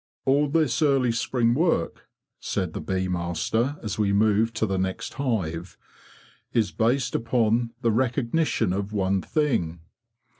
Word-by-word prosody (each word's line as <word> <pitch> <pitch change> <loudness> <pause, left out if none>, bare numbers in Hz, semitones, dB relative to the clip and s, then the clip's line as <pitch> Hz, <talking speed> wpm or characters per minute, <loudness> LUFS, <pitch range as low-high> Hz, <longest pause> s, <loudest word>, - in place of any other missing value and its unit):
'" - - -63
All 140 +2 +3
this 155 -2 +1
early 135 -5 +3
spring 115 0 +1
work,'' 160 - 0 0.3
said 90 -5 -2
the - - -4
bee 95 -1 -1
master, 90 - -1
as 105 -2 -4
we 100 -2 +2
moved 110 +2 +2
to - - +1
the 95 -2 -1
next 95 0 -3
hive, 95 - -3 0.4
'' - - -28
is 110 - 0
based 125 +3 +1
upon 115 0 +1
the 115 -2 +2
recognition 120 - +1
of 100 +2 -3
one 95 -1 +1
thing. 115 - -1
115 Hz, 150 wpm, -25 LUFS, 95-130 Hz, 0.4 s, All